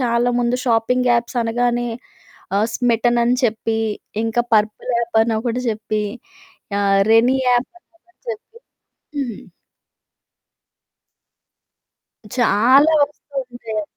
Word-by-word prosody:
చాలా 240 -1 +1
ముందు 240 +1 +1
షాపింగ్ 245 +2 +2
యాప్సనగానే 240 0 0 0.7
ఆహ్, 210 +2 +2
స్మిటనని 240 0 +2
చెప్పీ, 225 -1 0 0.5
ఇంకా 225 +1 +1
పర్పుల్ 215 +3 +1
యాప్పని 230 -1 +1
ఒకటి 245 +1 -2
జెప్పి, 215 -1 -2 0.8
ఆహ్, 195 -1 +3
రెనీ 240 +4 +4
యాప్పని 255 +8 -1
ఒకటి 355 +1 -35
జెప్పి. 455 +1 -8 0.6
హ్మ్. 250 -7 -4 3.0
చాలా 255 +6 +4
ఒస్తూ 285 0 -16
ఉన్నాయి. 230 -3 -5
235 Hz, 90 wpm, -19 LUFS, 225-250 Hz, 3.0 s, రెనీ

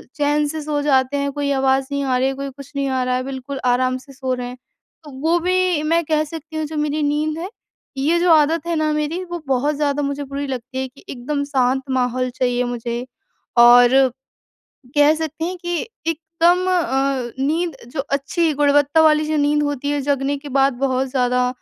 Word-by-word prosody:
चैन 295 0 +1
से 315 +1 -4
सो 295 -1 -2
जाते 275 -1 +2
हैं, 280 0 -1
कोई 285 0 -2
आवाज़ 265 0 +2
नहीं 280 0 -1
आ 255 -2 +1
रही 260 +1 +2
है, 270 - -1
कोई 275 0 -5
कुछ 275 +1 -12
नहीं 275 -1 -1
आ 260 -1 0
रहा 250 0 0
है 255 - -1
बिल्कुल 270 0 -6
आराम 255 +1 +2
से 275 +2 -14
सो 260 -1 -3
रहे 250 -1 -4
हैं। 250 +1 -8 0.5
तो 295 - -11
वो 330 +2 +3
भी 365 -3 +1
मैं 335 +2 +2
कह 310 0 +1
सकती 315 0 -9
हूँ 315 - -1
जो 310 0 -6
मेरी 300 0 -1
नींद 305 +2 0
है 360 +4 -5 0.5
ये 305 +6 +2
जो 350 -1 +3
आदत 315 +1 +3
है 340 - 0
ना 310 -1 +1
मेरी 305 +4 -2
वो 345 - -3
बहुत 275 +3 +1
ज़्यादा 290 0 0
मुझे 280 +1 -2
बुरी 280 +1 -5
लगती 260 0 -6
है 265 0 -2
कि 265 +2 -19
एकदम 285 +3 -3
शांत 265 -2 +1
माहौल 255 0 0
चाहिए 250 -1 0
मुझे। 240 0 -4 0.5
और 240 +1 +8 1.1
कह 290 +1 +6
सकते 320 0 -4
हैं 365 +1 -4
कि 345 -1 -3 0.3
एकदम 335 +3 +1
अ, 270 -7 0
नींद 320 +3 0 0.2
जो - - -4
अच्छी 290 +4 0
गुणवत्ता 290 +2 +3
वाली 305 -1 +4
जो 310 -1 0
नींद 295 +1 +2
होती 285 -1 -2
है 290 -1 -1
जगने 280 0 0
के 285 0 -10
बाद 270 -1 +4
बहुत 260 0 0
ज़्यादा 250 -1 +1
285 Hz, 205 wpm, -20 LUFS, 260-310 Hz, 1.1 s, और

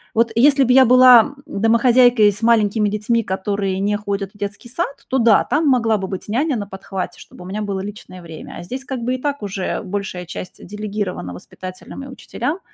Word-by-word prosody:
вот 230 +1 +2
если 275 +3 +5
бы 250 - +3
я 265 0 +7
была, 255 0 +8 0.3
м, 200 - -5
домохозяйкой 235 0 +5
и - - +1
с 205 - -11
маленькими 220 -2 +2
детьми, 215 +3 0
которые 195 0 -2
не 205 +1 0
ходят 200 -1 -4
в - - -19
детский 205 +3 -6
сад, 280 +2 -4
то 265 - +1
да, 230 -3 +5
там 305 +1 0
могла 230 -5 +3
бы 190 -1 -4
быть 190 +1 -6
няня 270 +5 0
на 205 - -4
подхвате, 190 -1 -6
чтобы 180 - -13
у - - -9
меня 205 +3 -4
было 200 -2 -3
личное 200 -3 -9
время. 160 -2 -10
А - - -8
здесь, 255 +9 -6
как 265 -3 -5
бы, 250 +2 0
и 255 - -7
так 285 -5 -3
уже 195 -2 -3
большая 190 -2 -5
часть, 180 +1 -8
э, - - -12
делегирована 205 - -5
воспитателям 185 - -10
и 275 - -9
учителям. 295 +5 -5
210 Hz, 215 wpm, -19 LUFS, 195-250 Hz, 0.3 s, была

